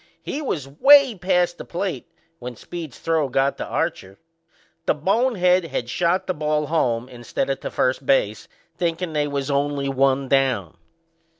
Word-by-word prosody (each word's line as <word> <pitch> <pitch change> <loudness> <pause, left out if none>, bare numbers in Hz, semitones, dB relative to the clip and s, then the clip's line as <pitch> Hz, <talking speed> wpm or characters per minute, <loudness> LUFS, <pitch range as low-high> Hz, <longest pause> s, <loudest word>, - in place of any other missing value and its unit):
He 295 - -4
was 160 - -3
way 270 - +6
past 180 -2 0
the - - -5
plate 180 0 -4 0.3
when 125 0 -7
Speed's 160 0 -8
throw 160 -4 0
got 135 +2 0
to - - -3
Archer. 95 +1 -3 0.7
The - - +3
bonehead 185 - +2
had 125 -6 -4
shot 175 +5 +1
the 185 - -1
ball 150 -1 -1
home 125 -7 0
instead 125 +2 -3
o' - - +3
to - - -6
first 130 +2 0
base, 110 -6 +1 0.3
thinkin' 170 0 -2
they 150 -1 0
was 140 -1 -3
only 140 0 0
one 135 0 +1
down. 130 - +1
150 Hz, 160 wpm, -22 LUFS, 135-175 Hz, 0.7 s, way